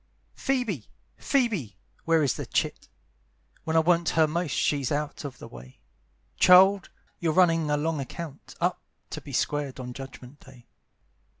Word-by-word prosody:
"PHOEBE! 245 - -2 0.3
Phoebe! 205 - 0 0.3
Where 165 -1 +3
is 135 - +2
the - - -6
chit? - - -2 0.8
When 160 - -1
I 160 - +6
want 170 0 +2
her 160 - +6
most 155 -3 -2
she's 140 -4 0
out 150 +1 -3
of 140 -3 -7
the - - -10
way. 60 +1 -13 0.6
Child, 190 +1 +6 0.3
you're 165 -2 0
running 165 -3 +3
a 150 - +2
long 155 +1 -1
account 140 +2 -8
Up, - - 0 0.3
to - - -5
be - - -10
squared 145 -3 -1
on 125 -1 -6
Judgment 135 +1 -10
day. 130 -3 -17
155 Hz, 155 wpm, -27 LUFS, 135-170 Hz, 0.8 s, I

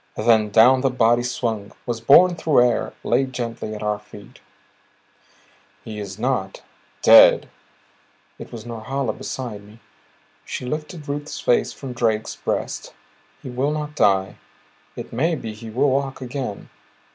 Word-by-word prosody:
Then 110 -1 +3
down 120 +5 +5
the 135 - +2
body 120 -1 +3
swung, 115 -4 -3
was 120 -2 -3
borne 175 +9 +6
through 145 -7 +3
air, 120 - -2
laid 130 +2 0
gently 115 -3 -4
at 105 - -7
our 105 -1 -1
feet. 105 -1 -15 1.4
"He 110 -1 -7
is 100 -2 -7
not 110 -5 -2 0.4
dead," - - +7 0.9
it - - -10
was 115 -2 -9
Norhala 120 +1 -3
beside 120 -6 -6
me; 105 +2 -17 0.6
she - - -6
lifted 150 +3 -5
Ruth's 145 +1 -5
face 120 - +1
from 135 -3 -8
Drake's 110 -3 -1
breast. - - -4 0.5
"He 130 - -7
will 130 +4 0
not 150 0 -4
die. 95 -6 +2 0.6
It - - -8
may 160 +8 +1
be 110 -7 -6
he 110 +1 -10
will 130 +5 +1
walk 135 0 -1
again. 130 -4 -6
120 Hz, 145 wpm, -22 LUFS, 110-135 Hz, 1.4 s, dead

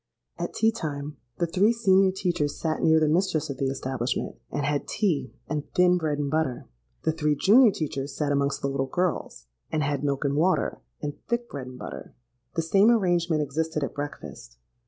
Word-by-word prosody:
"At - - -4
tea 225 0 +3
time, 150 -8 -5 0.2
the 170 - +1
three 190 +6 +3
senior 195 -4 +4
teachers 175 -6 -1
sate 160 -1 -1
near 160 0 +5
the 155 - +3
mistress 155 -2 +1
of 135 - -6
the 135 0 0
establishment, 130 -2 -2
and 145 - -2
had 145 -1 -1
tea 185 -9 0 0.2
and 150 -1 -4
thin 180 -1 +5
bread 155 -3 -1
and 145 -1 -2
butter: 155 -5 -1 0.4
the 160 - +2
three 150 -2 0
junior 220 - +6
teachers 140 -5 -4
sate 150 -2 0
amongst 140 0 0
the - - +2
little 135 -1 -1
girls, 175 - -2 0.3
and 155 -1 0
had 145 0 -1
milk 140 0 0
and 140 0 +1
water, 175 +5 +1 0.2
and 145 -1 -5
thick 235 0 -1
bread 135 -3 -6
and 130 0 -9
butter. - - -8 0.4
The 165 - 0
same 195 +6 +4
arrangement 175 -8 +2
existed 155 +2 -2
at 140 - -3
breakfast. 75 - -7
155 Hz, 190 wpm, -26 LUFS, 140-180 Hz, 0.4 s, junior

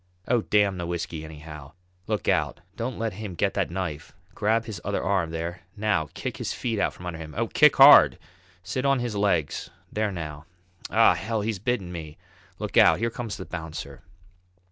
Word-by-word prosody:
Oh, 120 -2 +3
damn 100 -3 +2
the 85 - -3
whisky 85 -2 -4
anyhow! 75 -2 -10 0.3
Look - - -2
out - - +1
don't 120 +2 -4
let 115 -1 -2
him 100 -2 -7
get - - 0
that - - 0
knife! 85 -4 -5 0.2
Grab 110 +2 +1
his 105 -6 -7
other 100 0 -2
arm, 95 -3 +1
there! 85 +2 -4 0.2
now, 100 -8 0
kick - - -4
his - - -3
feet 115 -4 -2
from 90 - -12
under 85 -2 -5
him! 75 -2 -9
Oh, - - 0
kick - - +5
hard! - - +9 0.5
Sit 130 +6 -3
on 140 0 +3
his 120 -3 -3
legs; 100 -7 0 0.2
there 105 -1 0
now. 75 -4 -6 0.4
Ah! 115 -3 +5
Hell! 105 +6 -2
he's 105 -1 -2
bitten 100 -4 -2
me! 80 -3 -7 0.4
Look - - -4
out! - - +7
here 115 +1 -1
comes 115 -2 -5
the 95 - -7
bouncer!" 80 -5 -7
95 Hz, 185 wpm, -26 LUFS, 80-110 Hz, 0.5 s, hard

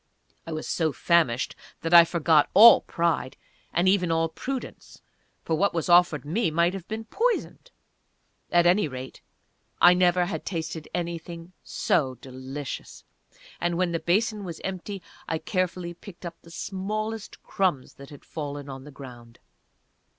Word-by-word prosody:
I - - -5
was 155 0 -4
so 160 -2 0
famished 150 -7 +1 0.3
that 165 +1 -2
I 170 -1 +10
forgot 160 -3 +3
all 230 +2 +9
pride, 165 -6 -1 0.3
and 175 +2 +1
even 185 -3 +3
all 165 0 +1
prudence 260 +10 -7 0.4
(for 165 - -2
what 195 +3 +1
was 165 0 -2
offered 175 -6 +4
me 175 +6 0
might 170 +3 +2
have 190 -3 -7
been 220 +1 -5
poisoned)! 480 - -2 0.8
At 175 0 +4
any 180 +1 +4
rate, 130 -1 -8 0.6
I 175 - +8
never 180 0 +3
had 190 - -4
tasted 160 -3 -5
anything 170 0 -5
so 135 -6 0
delicious; 130 +2 -8 0.6
and 175 0 -1
when 180 -1 +1
the 165 - -1
basin 205 +6 0
was 170 -4 -7
empty 190 0 -5 0.2
I 160 - -1
carefully 180 -1 -2
picked 180 0 -13
up 170 -1 -7
the 170 - -16
smallest 210 +5 -5
crumbs 180 -9 -1
that 140 0 -12
had 145 -2 -14
fallen 145 -2 -6
on 135 0 -8
the - - -10
ground. 120 -4 -12
170 Hz, 150 wpm, -26 LUFS, 155-185 Hz, 0.8 s, I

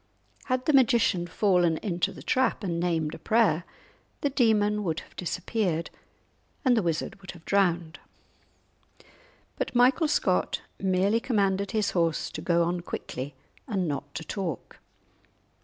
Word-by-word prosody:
Had 255 -1 -1
the 305 - +2
magician 230 -9 +3
fallen 175 -3 +2
into 175 -3 -1
the - - -11
trap 255 -4 +1
and 170 -3 -1
named 165 -3 0
a 165 - -8
prayer, 195 -3 +2 0.6
the 285 - 0
demon 210 -5 +2
would 165 -4 -2
have - - -19
disappeared 180 -1 -2 0.7
and 250 -2 +5
the 225 - +3
wizard 170 +2 -2
would 190 - -13
have 170 -2 -16
been - - -12
drowned! 175 -4 +1 1.6
But - - -3
Michael 255 +6 +4
Scott 300 - +1 0.2
merely 195 +3 +2
commanded 200 -5 0
his 215 -2 0
steed 165 -3 +2 0.2
to - - -5
go 170 -1 +2
on 175 +1 -1
quickly 135 -4 -6 0.3
and 195 -7 -1
not 145 -1 -4
to 165 - -4
talk. 170 - -5
190 Hz, 145 wpm, -27 LUFS, 170-220 Hz, 1.6 s, and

